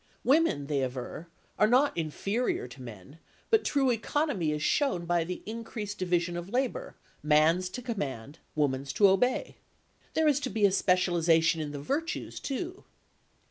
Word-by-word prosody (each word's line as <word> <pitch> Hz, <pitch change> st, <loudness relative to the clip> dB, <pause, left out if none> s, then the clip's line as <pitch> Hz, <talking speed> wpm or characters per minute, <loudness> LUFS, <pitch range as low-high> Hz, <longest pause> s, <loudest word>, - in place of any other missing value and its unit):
Women, 270 Hz, -, +3 dB
they 140 Hz, -1 st, 0 dB
aver, 130 Hz, +5 st, -5 dB, 0.3 s
are 215 Hz, -, +6 dB
not 260 Hz, +5 st, +3 dB
inferior 195 Hz, -, -1 dB
to 130 Hz, +2 st, -12 dB
men, 115 Hz, -, -11 dB, 0.3 s
but 445 Hz, -1 st, +4 dB
true 270 Hz, -3 st, +2 dB
economy 230 Hz, -, 0 dB
is 150 Hz, 0 st, -2 dB
shown 185 Hz, -, +1 dB
by 175 Hz, 0 st, +2 dB, 0.2 s
increased 220 Hz, -2 st, -6 dB
division 175 Hz, -1 st, 0 dB
of 175 Hz, +2 st, -5 dB
labour: 265 Hz, -, -2 dB, 0.3 s
man's 155 Hz, +5 st, +3 dB
to 250 Hz, +7 st, -7 dB
command, 145 Hz, -, -5 dB, 0.2 s
woman's 135 Hz, -2 st, 0 dB
to 205 Hz, -, +6 dB
obey. 220 Hz, +7 st, +1 dB, 0.6 s
There 320 Hz, -1 st, +3 dB
is 290 Hz, -2 st, +3 dB
to 270 Hz, -, -3 dB
be 215 Hz, -4 st, +2 dB
a 200 Hz, -, +4 dB
specialisation 170 Hz, -4 st, +3 dB
in 150 Hz, -1 st, -4 dB
the 145 Hz, -, -6 dB
virtues, 295 Hz, -, -3 dB
too. 345 Hz, +7 st, -5 dB
185 Hz, 150 wpm, -29 LUFS, 150-250 Hz, 0.6 s, are